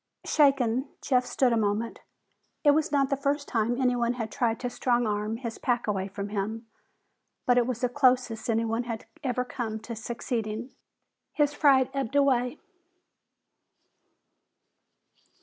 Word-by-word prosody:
Shaken, 270 -3 +3 0.2
Jeff 250 -2 +2
stood 255 -3 +2
a - - +2
moment. 215 +2 -1 0.6
It 290 - +7
was 310 +1 +1
not 275 -2 +2
the - - +3
first 280 +1 -1
time 235 +1 0
anyone 245 -2 +2
had 225 -3 -4
tried 230 -4 0
to 245 - -1
strong 240 -1 +1
arm 210 +1 -1
his 230 -2 -6
pack 245 -1 0
away 195 -2 -1
from 200 +1 -5
him, 215 +3 -3 0.8
but 245 0 +4
it 240 - +1
was 245 -2 -3
the 250 - +3
closest 250 -4 +2
anyone 225 +1 0
had 230 -2 -5 0.2
ever 250 -2 -1
come 225 -3 -4
to 230 +1 -6
succeeding. 230 +1 -4 0.6
His 290 -1 +2
fright 275 -4 +4
ebbed 275 -1 -3
away. 265 -1 +2
245 Hz, 145 wpm, -27 LUFS, 225-265 Hz, 0.8 s, It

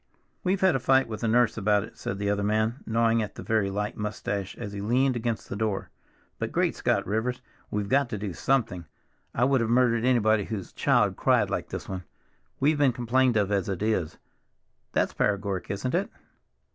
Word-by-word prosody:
"We've 185 +1 +1
had 190 -4 +4
a - - +1
fight 130 +1 +3
with 110 -1 -6
the 115 - 0
nurse 115 0 +3
about 105 0 +2
it," - - -11
said 100 - -4
the 100 0 0
other 100 0 0
man, 110 +4 0
gnawing 115 0 +2
at 105 - -5
a - - -6
very 110 -3 +1
light 105 +1 -3
mustache 105 -2 -4
as 105 -4 -6
he 100 - -5
leaned 125 +5 +2
against 115 -1 -2
the - - -5
door, 105 -2 -2 0.5
"but - - -2
Great - - +1
Scott, - - 0
Rivers, 125 +5 -2 0.3
we've 105 -1 -2
got 135 +3 +2
to 105 - -3
do 100 -2 -4
something. 110 -6 0 0.5
I 120 - +2
would 135 -1 +3
have 115 - 0
murdered 120 -1 +3
anybody 110 -5 +3
whose 105 -5 -6
child - - +2
cried - - +2
like - - -2
this - - -6
one. 95 -1 -5 0.6
We've 150 +2 +2
been 140 -4 +4
complained 120 0 +2
of 100 -1 +1
as 100 -2 0
it 95 +1 -2
is. 105 -8 0 0.7
That's - - +1
paregoric, 100 -2 -1
isn't 100 +6 -2
it?" 185 +4 0
110 Hz, 200 wpm, -27 LUFS, 100-125 Hz, 0.7 s, had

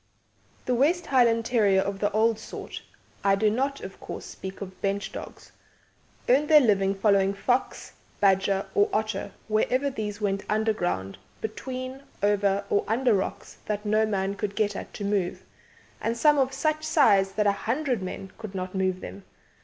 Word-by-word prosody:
"The 250 - +1
West 325 +8 +2
Highland 235 -4 +3
Terrier 205 -6 +3
of 195 0 -3
the 205 - +1
old 220 +1 +2
sort - - -8 0.4
I 195 0 +4
do 210 +1 +2
not, 275 +5 -1
of - - -9
course, - - -7
speak 190 0 -8
of 190 -2 -9
bench 200 0 -1
dogs - - -9 0.8
earned 275 +4 +4
their 305 0 +8
living 200 -6 +2
following 195 -1 +3
fox, 245 +6 -1 0.3
badger, 195 0 +3
or 410 +1 +3
otter 215 - -2 0.2
wherever 255 +6 +1
these 210 -4 -4
went 195 -2 -1
underground, 175 - -1 0.2
between, 255 +4 -5 0.2
over, 200 -1 +2
or 205 - +3
under 240 +2 +2
rocks 190 -1 -3
that 210 0 -2
no 215 +1 +2
man 195 -2 -1
could 205 -1 -4
get 215 -2 0
at - - -6
to 205 - -5
move, 200 -3 -1 0.6
and 230 +1 -1
some 295 +3 +4
of 265 0 +2
such 310 +2 -1
size 200 -11 +4
that 210 0 +1
a 200 - +5
hundred 245 +3 -1
men 185 +1 -6
could 215 -3 -8
not 185 0 -4
move 185 -1 0
them. 95 +2 -8
210 Hz, 170 wpm, -26 LUFS, 195-245 Hz, 0.8 s, their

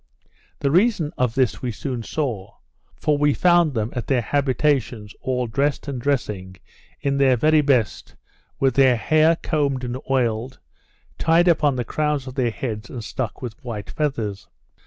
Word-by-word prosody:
The 140 -1 +1
reason 180 -3 +2
of 125 -3 0
this 130 -4 +1
we 125 - -2
soon 125 +1 -4
saw; 115 -7 -4 0.4
for 150 -1 0
we 145 -1 +3
found 175 -5 +3
them 110 0 -1
at 120 -5 -4
their 125 -3 +1
habitations, 130 -5 0
all 125 -1 -1
dressed 140 +6 -1
and 135 -3 -4
dressing, 105 -9 -2 0.5
in 140 0 0
their 130 -2 +4
very 155 +5 +4
best, 135 -6 0 0.4
with 135 -2 +2
their 130 -1 +5
hair 155 +7 +3
combed 140 -6 -1
and 125 +1 -3
oiled, 125 -1 0 0.6
tied 165 +2 +3
up 170 -3 +4
upon 145 -3 +2
the 125 -2 -2
crowns 150 +1 -1
of 130 - -7
their 125 -3 0
heads, 110 -2 -5
and 120 -3 -6
stuck 125 +2 -5
with 120 +3 -7
white 110 -5 -6
feathers. 115 - -3
130 Hz, 165 wpm, -22 LUFS, 120-150 Hz, 0.6 s, their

